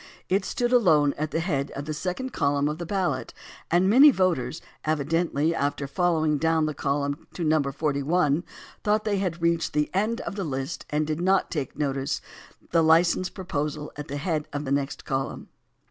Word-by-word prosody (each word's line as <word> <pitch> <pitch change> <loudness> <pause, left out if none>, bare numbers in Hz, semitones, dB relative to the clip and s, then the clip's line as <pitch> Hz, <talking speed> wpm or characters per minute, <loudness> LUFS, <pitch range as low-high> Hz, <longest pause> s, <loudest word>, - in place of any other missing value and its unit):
It 190 +1 +2
stood 245 0 -1
alone 155 - +4
at 155 +1 -2
the 165 - -1
head 145 -5 -1
of 140 - -5
the 155 - -3
second 185 - -4
column 140 0 +1
of 150 +2 -3
the 170 - -5
ballot, 190 -2 -1 0.3
and 175 +2 +3
many 265 +9 +8
voters 175 - +1 0.2
evidently, 155 +1 +1
after 145 -2 -1
fol 175 +4 +1
lowing 155 -2 +1
down 160 0 +2
the 155 - -2
column 140 0 -2
to 175 - -3
No. 155 -1 +3
41, 145 +3 0 0.4
thought 210 +1 +2
they 205 -2 0
had 175 -3 -2
reached 170 0 +1
the 150 0 0
end 215 +5 0
of - - -5
the 195 - -1
hst 135 -3 -4
and 150 +1 0
did 155 +2 -2
not 190 -1 +2 0.2
notice 140 0 -1 0.5
the 165 - +4
license 170 +3 +4
proposal 150 -5 -4
at 150 0 -7
the 145 - -4
head 155 -1 -2
of 145 +1 -4
the 135 - -3
next 140 +1 -1
column. 135 -1 -3
155 Hz, 185 wpm, -26 LUFS, 145-180 Hz, 0.5 s, many